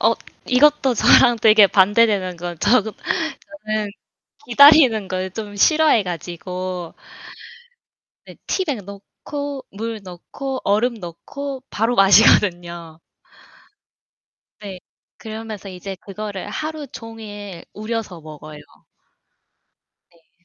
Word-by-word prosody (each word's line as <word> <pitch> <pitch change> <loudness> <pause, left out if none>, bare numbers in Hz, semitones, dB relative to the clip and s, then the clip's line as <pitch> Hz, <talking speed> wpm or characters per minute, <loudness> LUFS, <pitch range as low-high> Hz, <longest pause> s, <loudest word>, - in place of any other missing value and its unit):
어 - - +3 0.4
이것도 270 0 +4
저랑 240 +2 +5
되게 215 -2 +7
반대되는 195 -1 +2
거 175 0 -6
저 235 +5 +4 0.6
저는 215 -9 -4 0.6
기다리는 260 -5 +6
걸 185 0 -3
좀 205 0 -7
싫어해 305 -1 +4
가지고. 180 0 -6 1.3
네 - - -13
티백 290 - -2
넣고 275 +8 -8
물 220 +1 -6
넣고 260 +9 -7
얼음 225 +5 +1
넣고 255 +9 -8
바로 225 +3 -1
마시거든요. 175 -5 +3 1.6
네. 195 -3 -8 0.4
그러면서 220 -2 -8
이제 190 +1 -8
그거를 205 0 -7
하루 310 +6 -5
종일 205 -6 -10
우려서 215 -4 -5
먹어요. 155 -1 -11 1.6
네. 170 +1 -32
210 Hz, 200 characters per minute, -20 LUFS, 185-240 Hz, 1.6 s, 되게